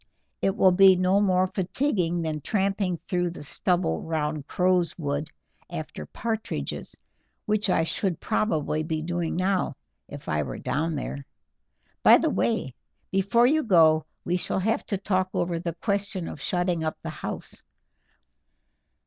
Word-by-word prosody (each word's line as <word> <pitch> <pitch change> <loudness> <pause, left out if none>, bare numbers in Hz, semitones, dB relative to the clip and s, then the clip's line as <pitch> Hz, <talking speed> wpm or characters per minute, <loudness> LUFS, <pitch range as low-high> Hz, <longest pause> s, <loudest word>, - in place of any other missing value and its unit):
"It 195 - +1
will 190 -3 +5
be 190 +1 +7
no 185 +2 +3
more 185 -2 +3
fatiguing 185 - -1
than 155 -2 -3
tramping 195 -1 0
through 180 -1 0
the 170 - -8
stubble 175 +4 0
round 155 -2 -2
Crowswood 165 -5 0 0.4
after 165 -3 -6
partridges, 220 - -4 0.5
which 210 -1 +1
I 165 - +3
should 175 +1 -1
probably 155 -7 0
be 155 0 -2
doing 170 0 -2
now 185 -4 0 0.3
if 145 -1 -10
I 75 0 +1
were 70 - -5
down 160 +2 -1
there. 140 0 -4 0.8
By - - +8
the - - +1
way, 115 +2 0 0.4
before 200 +5 +3
you 310 +5 +4
go 160 - +4 0.2
we 180 - +1
shall 180 - -2
have 220 +4 0
to 200 - -1
talk 185 -1 0
over 170 -1 0
the 170 -1 -4
question 200 -2 -2
of 145 - -7
shutting 175 -1 0
up 155 - -2
the 160 - -4
house. 155 - -6
180 Hz, 145 wpm, -26 LUFS, 155-195 Hz, 0.8 s, By